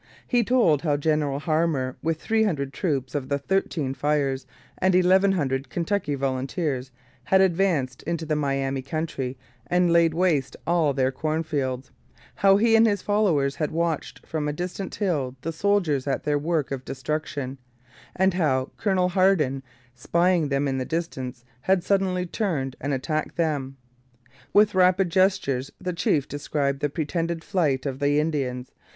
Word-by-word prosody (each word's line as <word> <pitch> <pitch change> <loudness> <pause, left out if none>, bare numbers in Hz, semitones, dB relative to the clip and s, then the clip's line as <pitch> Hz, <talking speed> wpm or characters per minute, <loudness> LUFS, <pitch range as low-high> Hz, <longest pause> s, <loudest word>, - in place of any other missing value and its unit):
He 245 -2 +2
told 215 - +3
how 150 -4 +1
General 150 -2 0
Harmar, 155 -5 0
with 160 -1 -1
three 220 +5 +1
hundred 140 -10 0
troops 140 -9 -2
of 140 -3 -3
the 140 - +1
Thirteen 150 -3 -1
Fires 140 -2 0 0.3
and 185 0 +3
eleven 190 +2 +4
hundred 135 -6 -1
Kentucky 175 -3 -1
volunteers, 135 0 -2 0.4
had 190 +8 +4
advanced 170 -9 +1
into 170 -1 -3
the 155 0 0
Miami 135 -2 -1
country 135 -3 -4 0.3
and 180 +1 +2
laid 165 -1 +4
waste 165 -7 +1
all 170 -3 +2
their 130 -1 +1
cornfields; 145 -3 -2 0.4
how 195 0 +4
he 225 +2 +4
and 225 0 +6
his 205 -3 0
followers 175 -10 +1
had 150 - -1
watched 165 -1 -2
from 155 -2 -3
a 150 - -1
distant 180 +4 -5
hill 145 -11 -1
the 165 - -3
soldiers 165 -7 +1
at 135 - -1
their 145 -1 +1
work 155 -2 -1
of 135 -2 -4
destruction; 140 -1 -4 0.6
and 190 0 +3
how 135 -7 0
Colonel 185 -3 +1
Hardin, 175 -8 +2 0.3
spying 170 +4 +1
them 140 +1 +1
in 135 -1 -1
the - - -1
distance, 130 -6 -4 0.2
had 185 +3 +2
suddenly 185 -2 +1
turned 165 - -2
and 145 - -2
attacked 155 +3 -2
them. 145 -5 -1 0.7
With 210 0 +5
rapid 185 -1 +3
gestures 165 -9 +1
the 180 - -3
chief 150 -4 +1
described 145 -1 -2
the 145 - 0
pretended 165 +2 -2
flight 150 -9 0
of 135 -1 -3
the 145 +1 +2
Indians. 135 -5 -2
155 Hz, 155 wpm, -25 LUFS, 135-180 Hz, 0.7 s, and